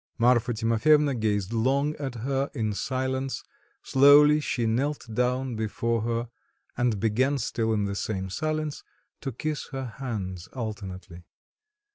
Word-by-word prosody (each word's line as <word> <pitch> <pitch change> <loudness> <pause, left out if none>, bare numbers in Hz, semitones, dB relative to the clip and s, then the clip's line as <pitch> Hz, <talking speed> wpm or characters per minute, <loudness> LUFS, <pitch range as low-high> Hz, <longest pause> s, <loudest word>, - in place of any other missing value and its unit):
Marfa 120 0 +3
Timofyevna 130 +6 +3
gazed 105 -3 -1
long 135 +6 +1
at 135 -4 -4
her 135 +4 -1
in 110 -2 -1
silence, 130 +3 -2 0.4
slowly 145 +2 +7
she 125 -5 -1
knelt 135 +7 0
down 125 +1 0
before 110 +1 -1
her 115 +1 -2 0.5
and 120 -4 +1
began 125 +7 +2
still 115 -2 -1
in 105 -2 +1
the 100 - -2
same 95 0 -3
silence 155 +4 -2 0.4
to 135 - -4
kiss 150 +5 -4
her 135 -1 -4
hands 95 -8 -4
alternately. 95 -7 -6
120 Hz, 130 wpm, -27 LUFS, 110-135 Hz, 0.5 s, slowly